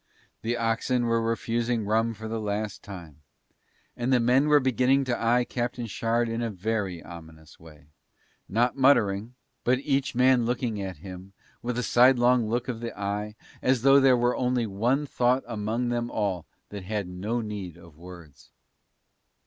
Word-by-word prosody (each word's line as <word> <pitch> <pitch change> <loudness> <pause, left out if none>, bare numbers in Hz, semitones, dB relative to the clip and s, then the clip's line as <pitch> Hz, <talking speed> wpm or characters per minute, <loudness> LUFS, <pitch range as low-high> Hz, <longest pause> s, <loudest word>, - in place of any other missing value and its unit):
The 120 +2 -1
oxen 115 +2 0
were 115 0 +1
refusing 115 0 -1
rum 115 +2 +1
for 110 +2 -7
the 110 0 -3
last 105 0 -3
time, 85 -7 -11 0.7
and 120 +2 -2
the 125 - +4
men 125 +5 +3
were 150 -1 +6
beginning 130 +1 +2
to 125 -2 -1
eye 120 +2 +3
Captain 120 0 -3
Shard 115 +2 0
in 115 +1 -3
a 115 - -1
very 100 -3 -3
ominous 80 -2 -13
way, 75 -3 -16 0.6
not 120 +4 +1
muttering, 120 -5 +2 0.3
but 125 +1 +3
each 135 -1 -1
man 125 0 +4
looking 115 -3 -2
at 95 -3 -5
him 95 +1 -9 0.3
with 120 0 -3
a 125 - -1
sidelong 125 -2 +4
look 120 +2 -1
of 120 -3 -4
the 115 -2 -7
eye 105 +1 -3 0.3
as 130 -2 +1
though 135 +1 +7
there 135 -2 +5
were 120 +1 +1
only 125 -1 0
one 120 +8 0
thought 125 -1 +1
among 115 +1 -2
them 120 0 -1
all 100 -7 -2 0.2
that 100 -1 -7
had 105 0 -3
no 100 +7 -3
need 100 -6 -6
of 85 -3 -16
words. 85 -3 -13
115 Hz, 165 wpm, -26 LUFS, 100-125 Hz, 0.7 s, though